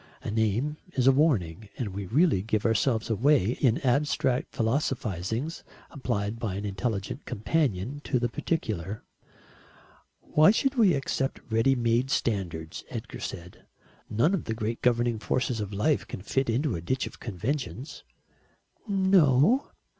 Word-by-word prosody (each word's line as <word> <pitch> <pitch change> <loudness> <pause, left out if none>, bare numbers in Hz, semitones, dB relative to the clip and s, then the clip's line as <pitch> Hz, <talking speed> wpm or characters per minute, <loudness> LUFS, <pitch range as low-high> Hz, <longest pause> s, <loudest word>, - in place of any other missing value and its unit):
A - - -3
name 110 +7 0 0.2
is 125 - +1
a 135 - +8
warning, 110 - +1
and 120 -5 -2
we 100 0 -5
really 140 - +3
give 110 +1 -1
ourselves 115 0 +1
away 115 -2 +3
in 125 -4 +4
abstract 130 -1 +1
philosophisings 115 - -1 0.3
applied 115 -6 -2
by 105 -5 -2
an 100 +2 -4
intelligent 100 0 -3
companion 130 - -1
to 130 - +1
the 120 0 +1
particular. 110 - -3 1.2
"Why 155 +1 +5
should 265 +6 +2
we 215 - +4
accept 135 -1 -2
ready 115 +4 +3
made 120 +1 +1
standards?" 85 -11 -2
Edgar - - -6
said. 90 +1 -8 0.4
"None 115 - +2
of 190 - -1
the 110 - -2
great 110 +1 -3
governing 120 -2 +2
forces 125 +1 -1
of 105 -1 -4
life 105 +9 +1
can 95 - -7
fit 135 +5 0
into 130 +3 +1
a 85 - -4
ditch 130 +10 -1
of - - -10
conventions." 125 - -4 0.8
"No." 190 - +4
120 Hz, 140 wpm, -27 LUFS, 105-140 Hz, 1.2 s, a